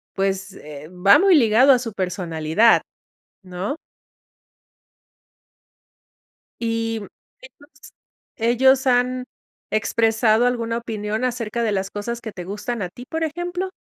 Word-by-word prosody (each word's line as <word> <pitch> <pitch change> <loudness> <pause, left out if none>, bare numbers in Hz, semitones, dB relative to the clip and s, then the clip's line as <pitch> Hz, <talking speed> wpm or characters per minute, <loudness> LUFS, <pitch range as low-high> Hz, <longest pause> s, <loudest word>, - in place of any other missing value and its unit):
pues, 195 0 -2
eh, 150 -3 -11
va 185 +3 +5
muy 385 -1 +5
ligado 245 0 +5
a 260 - +6
su 235 -3 -6
personalidad, 180 +2 +2 0.6
¿no? 185 - -5 2.9
Y, 225 -1 -1 0.4
¿ellos 335 -12 -17 0.4
ellos 260 +3 +3
han 250 0 +1 0.5
expresado 225 +1 +2
alguna 230 -2 -1
opinión 220 0 -4
acerca 235 -2 -2
de 220 - 0
las 195 -1 -2
cosas 235 +3 -5
que 225 -2 -7
te 180 - -8
gustan 205 +4 -4
a 180 - -4
ti, 245 +7 -12
por 320 0 -2
ejemplo? 350 +4 -4
225 Hz, 115 wpm, -21 LUFS, 200-250 Hz, 2.9 s, a